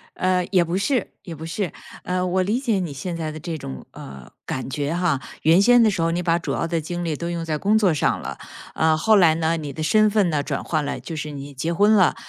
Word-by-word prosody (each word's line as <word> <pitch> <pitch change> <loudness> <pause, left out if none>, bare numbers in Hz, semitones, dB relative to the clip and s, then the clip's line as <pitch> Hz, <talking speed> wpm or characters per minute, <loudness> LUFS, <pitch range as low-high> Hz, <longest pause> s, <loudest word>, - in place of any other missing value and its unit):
呃， 185 -1 +1
也 185 -3 +4
不 170 +2 -2
是 250 +6 0
也 170 -4 -7
不 160 +1 -8
是。 175 +1 -3 0.3
呃， 180 0 -1
我 185 +1 +1
理 215 +6 0
解 230 -7 0
你 175 -5 -3
现 170 +5 -5
在 160 -2 -3
的 155 - -8
这 165 +1 -5
种， 65 - -8
呃， 70 -2 -11
感 130 - -4
觉 145 +3 -2
哈。 175 -6 +1 0.2
原 165 +4 +5
先 245 +2 +6
的 215 - +4
时 185 -4 -2
候 165 - +2
你 175 +1 -1
把 170 0 +2
主 - - -3
要 - - -1
的 170 0 -1
精 175 +2 -4
力 155 -2 -1
都 170 +2 -4
用 170 -1 -3
在 155 -2 -1
工 205 +7 +2
作 195 -6 +3
上 145 - +1
了， - - -6 0.4
呃， 160 0 +2
后 215 +7 +4
来 170 -5 +5
呢， 165 0 0
你 150 -3 -5
的 155 - -4
身 215 +6 +4
份 205 -4 +2
呢 150 - +1
转 - - -3
换 155 -3 -1
了， 145 - -3
就 165 - -7
是 150 0 -5
你 140 0 -8
结 160 +6 -2
婚 205 +4 +4
了。 185 -6 +4
170 Hz, 285 characters per minute, -22 LUFS, 155-185 Hz, 0.4 s, 先